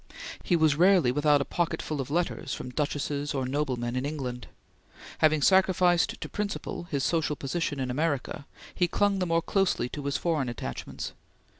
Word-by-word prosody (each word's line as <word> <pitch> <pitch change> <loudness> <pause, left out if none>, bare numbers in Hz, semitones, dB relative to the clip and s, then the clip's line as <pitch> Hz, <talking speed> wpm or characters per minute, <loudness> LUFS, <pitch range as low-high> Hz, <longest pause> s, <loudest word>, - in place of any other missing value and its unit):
He 175 - +2
was 155 -3 +3
rarely 180 -6 +5
without 145 +1 +3
a - - -1
pocket 170 +4 -1
full 150 -3 -3
of 130 - -6
letters 170 +4 -1
from 125 - -7
duchesses 145 +1 -2
or 135 -1 -1
noblemen 125 -3 -1
in 130 - -1
England. 130 -5 -4 0.7
Having 155 -2 +4
sacrificed 185 -2 +4
to - - -5
principle 205 -4 -4
his 140 -3 -1
social 160 -3 +1
position 145 0 -2
in 130 -1 -1
America, 145 -1 -2 0.3
he 175 - +2
clung 200 +2 +1
the 180 - 0
more 165 0 +1
closely 195 -10 +1
to 145 +1 -6
his 140 0 0
foreign 155 -7 0
attachments. 85 - -6
150 Hz, 170 wpm, -28 LUFS, 135-175 Hz, 0.7 s, rarely